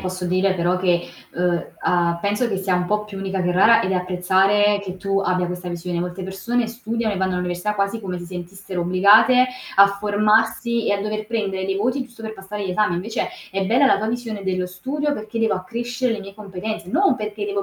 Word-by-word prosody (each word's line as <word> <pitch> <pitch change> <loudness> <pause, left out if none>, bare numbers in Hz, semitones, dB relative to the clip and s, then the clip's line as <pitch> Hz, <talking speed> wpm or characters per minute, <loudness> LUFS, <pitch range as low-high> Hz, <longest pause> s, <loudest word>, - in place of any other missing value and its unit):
posso 185 -1 -4
dire 185 +2 +2
però 175 +1 +1
che, 175 -2 +1 0.3
uhm, 175 -1 0
a 170 -1 +1
penso 205 +5 0
che 195 - -1
sia 190 -1 0
un 180 0 +1
po' 210 +2 0
più 200 -2 -8
unica 190 -1 -2
che 180 - +1
rara, 225 +6 +5
ed 190 - -1
apprezzare 190 +3 +2
che 185 -1 -6
tu 195 +1 -1
abbia 180 -2 0
questa 180 0 -5
visione. 175 0 -4
Molte 180 +2 -4
persone 210 +6 -1
studiano 230 -1 -2
e - - -5
vanno 190 0 0
all'università 180 +3 -2
quasi 200 +2 -1
come 185 -4 -4
si 175 - -8
sentissero 180 +1 -6
obbligate, 205 +8 +6 0.3
a 200 - +9
formarsi 220 +3 +2
e - - +3
a 200 - 0
dover 215 +1 -3
prendere 200 -5 -2
dei 195 0 -1
voti, 250 +6 0
giusto 240 -3 -15
per 220 0 -5
passare 200 +1 -6
gli - - -2
esami. 210 -1 +1
Invece 200 +6 -2 0.2
è 195 0 -1
bella 250 +6 +4
la - - +5
tua 215 +2 -2
visione 225 -4 -4
dello 185 -1 -1
studio, 285 +11 -2
perché 220 -2 -5
devo 225 -3 +2
accrescere 235 +6 -2
le 215 - -4
mie 195 0 -10
competenze, 205 -1 -6
non 330 -3 +3
perché 210 -1 -4
devo 200 -1 -2
195 Hz, 215 wpm, -22 LUFS, 185-220 Hz, 0.3 s, a